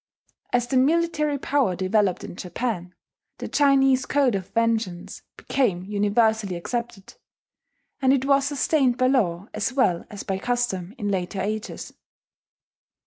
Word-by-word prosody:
As 245 -1 +2
the 260 +2 0
military 300 +1 +2
power 270 -8 +1
developed 190 0 +1
in - - -8
Japan, 180 -1 -4 0.4
the - - -6
Chinese 270 -2 +3
code 280 -4 +2
of 190 -2 -3
vengeance 225 -6 -1 0.2
became 200 -10 0
universally 210 0 +1
accepted; 230 +2 -5 0.9
and 260 -1 +4
it 270 -1 +2
was 275 0 +3
sustained 280 -3 +1
by 255 - +2
law 200 -8 +1
as 220 +4 -2
well 190 -11 +1
as 205 - -7
by 190 -1 -3
custom 225 -5 -2
in 205 -3 -3
later 190 0 -2
ages. 215 +3 -4
230 Hz, 135 wpm, -24 LUFS, 195-265 Hz, 0.9 s, and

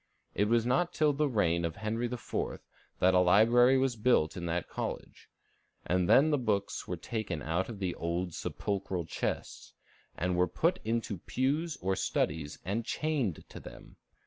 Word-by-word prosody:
It 105 - +2
was 115 +1 +2
not 170 +9 +1
till 150 -1 +3
the 150 +1 +1
reign 85 -8 +1
of 85 -1 -2
Henry 115 +3 -2
IV. 120 -1 -8 0.6
that 95 +1 +4
a 90 - +5
library 115 +8 +5
was 130 -2 +1
built 105 -8 +2
in 85 -2 -4
that 85 0 -2
college; - - -6 0.6
and 90 +1 +1
then 150 +4 +6
the 145 - +2
books 105 -5 -1
were - - -3
taken 95 -10 -4
out 85 +7 -1
of 115 - -6
the 95 -3 -2
old 85 +1 -3
sepulchral 95 -3 -3
chests, 80 - -4 0.4
and 90 +1 0
"were 90 +1 +3
put 170 - +1
into 110 -4 -2
pews 150 - -1
or 95 +1 +1
studies 75 -5 -1
and 105 +6 -1
chained 135 - -2
to - - -9
them." - - -12
105 Hz, 170 wpm, -31 LUFS, 90-125 Hz, 0.6 s, then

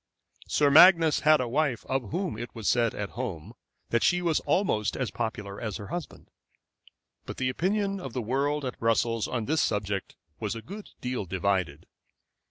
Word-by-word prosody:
Sir 145 -1 +3
Magnus 165 0 +7
had 155 0 +5
a 125 - -1
wife 135 -1 0
of 130 -5 -2
whom 180 - -2
it 120 +3 -7
was 115 -3 -4
said 120 -2 +2
at 105 0 -4
home 110 -11 -5 0.4
that 115 - +2
she 180 - +3
was 165 -3 +2
almost 110 - 0
as 130 -3 -2
popular 105 -4 -4
as 110 -4 -3
her 105 -3 -9
husband; 175 -1 -7 1.0
but - - -6
the 130 -1 0
opinion 195 +7 -1
of 135 -8 -6
the 125 - -2
world 140 +5 0
at 125 - -5
Brussels 115 0 +1
on 120 -3 -2
this 155 +4 +1
subject 100 -2 -2 0.2
was 105 +1 -3
a 115 - -7
good 200 - -9
deal 125 -4 -3
divided. 95 -4 -1
125 Hz, 175 wpm, -27 LUFS, 110-155 Hz, 1.0 s, Magnus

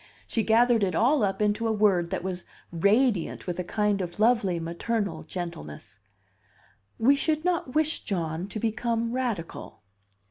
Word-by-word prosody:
She 225 - -1
gathered 230 0 +4
it 185 -4 0
all 255 - +3
up 200 +1 0
into 210 +2 +1
a - - +1
word 200 -5 +2
that 175 - -3
was 185 -1 -4 0.3
radiant 200 +3 +1
with 180 -1 -4
a - - 0
kind 205 +1 0
of 175 +1 -6
lovely 215 -6 +3
maternal 190 +4 -2
gentleness: 105 - -7 1.0
"We 260 +5 +5
should 310 +2 0
not 340 -7 -1
wish 310 0 +1
John 170 -2 -3
to 215 - -5
become 230 +1 -1
radical." 225 - -4
210 Hz, 150 wpm, -27 LUFS, 175-235 Hz, 1.0 s, We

